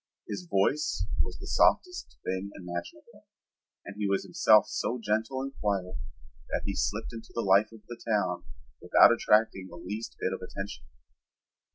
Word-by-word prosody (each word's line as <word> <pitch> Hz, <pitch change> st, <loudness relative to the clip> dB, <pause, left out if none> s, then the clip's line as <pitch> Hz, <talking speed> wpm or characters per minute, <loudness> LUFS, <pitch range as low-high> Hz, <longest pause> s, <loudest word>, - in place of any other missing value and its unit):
His 180 Hz, -, -5 dB
voice 145 Hz, +10 st, +1 dB, 0.2 s
was -, -, -3 dB
the -, -, -9 dB
softest 360 Hz, 0 st, +2 dB
thing 95 Hz, +2 st, -2 dB
imaginable, 85 Hz, -1 st, -8 dB, 0.6 s
and 100 Hz, -, -8 dB
he 105 Hz, -, 0 dB
was 100 Hz, 0 st, +1 dB
himself -, -, +5 dB
so 125 Hz, -, -2 dB
gentle 115 Hz, +5 st, -1 dB
and 135 Hz, 0 st, -5 dB
quiet 95 Hz, -3 st, -1 dB, 0.5 s
that -, -, -1 dB
he 100 Hz, -, -2 dB
slipped 110 Hz, +3 st, -2 dB
into 115 Hz, -1 st, -9 dB
the 115 Hz, -, 0 dB
life 100 Hz, +2 st, +4 dB
of 115 Hz, -1 st, -13 dB
the 120 Hz, -1 st, -9 dB
town 90 Hz, -4 st, +1 dB, 0.4 s
without -, -, +7 dB
attracting 105 Hz, -3 st, +2 dB
the 85 Hz, -, -11 dB
least 105 Hz, +6 st, -6 dB
bit 95 Hz, -, -1 dB
of -, -, -5 dB
attention. 90 Hz, -10 st, -7 dB
105 Hz, 160 wpm, -29 LUFS, 95-115 Hz, 0.6 s, without